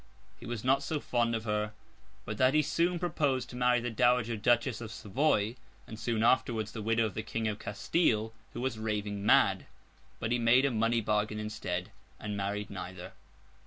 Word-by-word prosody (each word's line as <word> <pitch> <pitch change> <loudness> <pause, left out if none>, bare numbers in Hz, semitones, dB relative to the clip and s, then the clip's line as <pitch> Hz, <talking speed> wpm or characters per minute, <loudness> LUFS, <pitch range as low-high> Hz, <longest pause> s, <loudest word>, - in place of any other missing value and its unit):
He - - -9
was 120 -3 -4
not 135 +2 +3
so 150 +2 -2
fond 120 -3 0
of 110 - -3
her 105 -1 -1 0.5
but 105 - -5
that 130 +2 +4
he 155 - +5
soon 175 +4 +1
proposed 145 -7 -1
to - - -9
marry 125 0 +3
the 120 0 -3
Dowager 120 0 +2
Duchess 120 +2 +1
of 110 -2 -6
Savoy; 115 0 0 0.3
and, 110 - -9
soon 110 -1 0
afterwards, 115 -3 +2
the 110 - -6
widow 115 +1 +2
of 105 - -3
the 110 - -3
King 110 0 -3
of 105 -1 -3
Castile, 110 -1 0 0.2
who 120 - -5
was 125 -4 -2
raving 105 -2 -2
mad. 105 - +4 0.5
But 110 - -2
he 120 - +2
made 120 +3 +5
a 140 - +2
money 115 +1 +1
bargain 105 0 0
instead, 105 -3 -4 0.3
and 105 -1 -4
married 100 +1 -3
neither. 90 -1 -7
115 Hz, 190 wpm, -31 LUFS, 105-125 Hz, 0.5 s, he